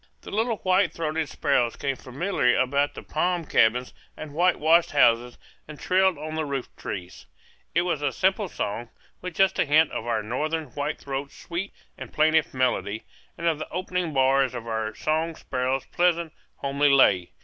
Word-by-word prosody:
The - - -10
little 225 +1 0
white 185 -2 +2
throated 160 -1 -2
sparrows 125 -5 +1
came 135 -1 -2
familiarly 130 -1 0
about 140 +2 +1
the - - -8
palm 175 +1 -1
cabins 125 -1 +2 0.2
and 155 -2 -8
whitewashed 170 0 +3
houses 120 -3 +3 0.3
and 150 -1 -10
trilled 190 -2 +2
on 155 +1 -6
the 160 - -1
rooftrees. 125 -10 -6 0.5
It 170 - +4
was 170 -5 -1
a 145 -2 0
simple 190 - +1
song, 115 -1 -4 0.3
with 180 -2 -6
just 195 +1 +2
a - - +3
hint 155 +2 +4
of 115 - -5
our 110 -2 0
northern 155 +7 -2
white 145 +4 -3
throat's 140 0 -6
sweet 175 +3 -5 0.3
and - - -8
plaintive 155 0 +3
melody, 120 -4 -1 0.3
and 170 - -5
of 160 -3 +1
the 155 - -6
opening 180 -2 -2
bars 135 -1 +2
of 120 -1 -6
our 110 -2 -3
song 160 +1 -1
sparrow's 130 0 -2
pleasant, 170 -2 +1 0.2
homely 140 +1 +1
lay. 100 -10 +4
150 Hz, 170 wpm, -25 LUFS, 130-170 Hz, 0.5 s, It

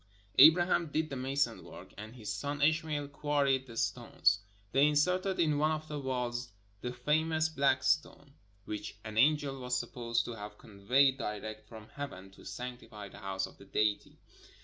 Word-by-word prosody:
Abraham 170 +3 +7
did 155 +1 -2
the - - -3
mason 135 +2 -1
work, - - -12
and 110 +3 -9
his 105 -4 -5
son 145 +8 -4
Ishmael 155 -2 +1
quarried 140 -2 +1
the 115 -2 -10
stones. 100 -2 +1 0.3
They 140 +4 +5
inserted 180 +6 +1
in 155 -3 +2
one 155 +1 +3
of 155 0 -3
the 150 -1 -4
walls 125 -2 -3 0.3
the 125 - -3
famous 155 +5 +1
"black 140 -3 +2
stone," 145 -2 0 0.3
which 105 -1 -6
an 110 -1 -7
angel 145 0 +3
was 125 0 -1
supposed 120 -1 -2
to 120 - -5
have 105 -1 -8
conveyed 125 +6 +2
direct 110 +1 -5
from 110 -2 -11
heaven 95 -10 -8
to 95 - -16
sanctify 120 -4 -7
the - - -13
house 95 -1 -2
of - - -14
the 100 - -13
Deity. 105 +1 -1
130 Hz, 170 wpm, -32 LUFS, 110-150 Hz, 0.3 s, Abraham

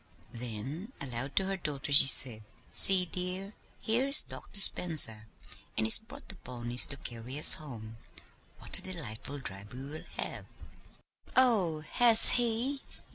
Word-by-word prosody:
Then 125 - -11
aloud 135 0 -8
to 190 - -2
her 195 0 -6
daughter 145 -5 -7
she 140 -1 +7
said: 125 -5 +2 0.3
"See, 190 -2 +6
dear, 185 +3 -7 0.3
here's 260 +5 +1
Dr. 200 - -5
Spencer, 145 - +3 0.5
and 110 - -3
he's 110 - +7
brought 220 - -17
the - - -13
ponies 120 -1 -1
to 145 - -8
carry 120 +1 -10
us 150 - +6
home. 115 -7 -8 0.6
What - - -2
a - - +2
delightful 145 -7 -10
drive 100 -5 -13
we 130 +1 -11
will 150 +3 -12
have!" - - -9 0.9
"Oh, 205 -12 -1
has 225 +8 +4
he?" 245 +4 -3
150 Hz, 140 wpm, -27 LUFS, 120-195 Hz, 0.9 s, she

